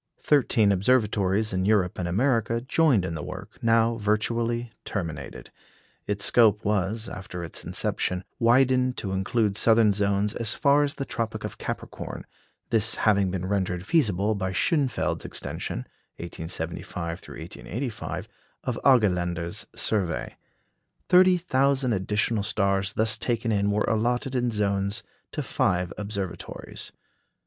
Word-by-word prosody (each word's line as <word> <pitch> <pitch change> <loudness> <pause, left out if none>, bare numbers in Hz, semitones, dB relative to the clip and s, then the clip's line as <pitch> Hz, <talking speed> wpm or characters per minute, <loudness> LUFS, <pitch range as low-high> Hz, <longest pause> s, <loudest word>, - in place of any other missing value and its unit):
Thirteen 115 -7 +4
observatories 105 -1 +2
in 95 0 0
Europe 95 -3 +2
and 90 - -1
America 115 +3 +1
joined 130 - +2
in 85 - -3
the 80 - -4
work, 95 +4 -8
now 115 0 +3
virtually 115 +2 0
terminated. 80 -8 -5 0.6
Its 100 0 -1
scope 110 -3 +4
was, 105 +2 0
after 90 -3 -7
its 80 - -6
inception, 90 0 -1 0.2
widened 125 +1 +3
to 95 - -3
include 100 +2 0
southern 110 -2 +5
zones 100 +1 +1
as 115 -2 -1
far 145 0 +4
as 145 -1 0
the 135 - -4
Tropic 115 -4 -3
of - - -6
Capricorn; - - -6 0.5
this 110 0 +3
having 100 -3 +3
been 90 0 -3
rendered 95 -2 -1
feasible 110 - +2
by 95 -2 -2
Schönfeld's 140 - 0
extension 65 - -5 0.3
(1875 85 0 -5
1885) 120 +2 -6 0.4
of - - -2
Argelander's 90 -9 +2
survey. 95 -6 0 0.7
Thirty 185 0 +6
thousand 135 -6 +1
additional 105 +3 0
stars 100 -1 0
thus 110 +1 +2
taken 115 -2 -1
in 100 -1 +2
were 105 +1 +1
allotted 120 +4 0
in 125 -1 +1
zones 100 0 -1 0.3
to - - -3
five 90 -2 0
observatories. 100 -3 -5
105 Hz, 125 wpm, -26 LUFS, 95-120 Hz, 0.7 s, Thirty